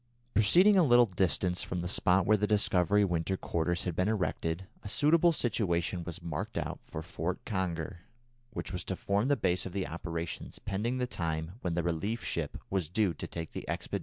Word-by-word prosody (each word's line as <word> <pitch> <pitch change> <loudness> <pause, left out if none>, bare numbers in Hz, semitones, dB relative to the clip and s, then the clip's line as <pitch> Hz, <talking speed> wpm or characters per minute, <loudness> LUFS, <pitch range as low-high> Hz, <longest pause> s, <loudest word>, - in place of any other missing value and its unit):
Proceeding 180 - +6
a 180 - +6
little 120 -4 +6
distance 90 -2 +1
from 90 -1 -3
the 90 - -3
spot 90 0 +3
where 110 - +5
the 105 0 +1
Discovery 105 -1 +3
winter 85 +1 -1
quarters 85 +1 -1
had 90 -3 -2
been 90 +3 +1
erected, 95 -4 -1 0.2
a 100 - -7
suitable 160 - +5
situation 90 - 0
was 85 0 -6
marked 85 -3 -4
out - - -3
for 80 - -6
"Fort - - -4
Conger," 85 -4 -2 0.5
which 95 - -5
was 90 - -3
to 95 - -2
form 100 +5 0
the 145 - +4
base 90 0 0
of 90 - -9
the 95 -2 -1
operations 85 0 -5
pending 105 +6 -2
the 125 - 0
time 80 -7 -3
when 85 -2 -1
the 85 - 0
relief 95 +8 -2
ship 80 -4 -2
was 95 -6 0
due 95 -1 +2
to - - -6
take 80 -2 -6
the - - -5
expedition - - +1
home - - -4
again. - - -7
90 Hz, 205 wpm, -31 LUFS, 85-105 Hz, 0.5 s, Proceeding